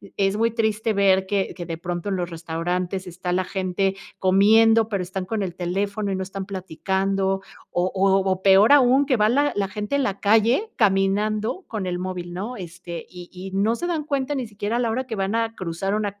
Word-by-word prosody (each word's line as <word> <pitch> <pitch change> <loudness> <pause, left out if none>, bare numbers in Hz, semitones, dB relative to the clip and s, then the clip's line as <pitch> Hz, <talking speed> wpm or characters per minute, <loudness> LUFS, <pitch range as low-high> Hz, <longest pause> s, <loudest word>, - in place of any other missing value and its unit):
es 195 0 +1
muy 230 +1 +2
triste 220 -1 0
ver 190 -1 +3
que 200 -1 -1
que 175 - -6
de 165 -1 -4
pronto 175 +3 -4
los 180 -2 -1
restaurantes 175 +3 -3
está 180 +1 -4
la 185 - +1
gente 190 +1 -1 0.2
comiendo, 220 +4 +5
pero, 200 -4 -1
están 190 0 -4
con 215 +2 -2
el 180 -3 -4
teléfono 200 +3 -2
y - - 0
no 190 - -2
están 190 0 -6
platicando. 195 +1 -1 0.3
O 180 +1 0
o 195 0 +3
o 185 0 -1
peor 195 +5 +6
aún, 270 0 +5
que 265 -3 +2
va 210 0 +3
la 285 +4 +2
la 200 -1 0
gente 210 +7 -3
en 280 - +1
la 200 -4 -2
calle 225 - +3
caminando 210 - +1
con 210 -4 -4
el 180 -1 -2
móvil, 180 -1 -5
¿no? 210 +8 -5
Este, 175 -2 -8
y 175 -1 -11
y 185 +1 -8
no 200 +4 +1
se 345 +8 -3
dan 325 -3 -1
cuenta 285 -1 -1
ni 255 -4 -3
siquiera 210 +2 -3
a - - 0
la 240 -2 +1
hora 255 +4 -1
que 230 - -5
van 195 +2 -1
a 230 0 0
cruzar 185 +2 -3
una 205 -1 -2
calle, - - -42
195 Hz, 220 wpm, -23 LUFS, 185-220 Hz, 0.3 s, peor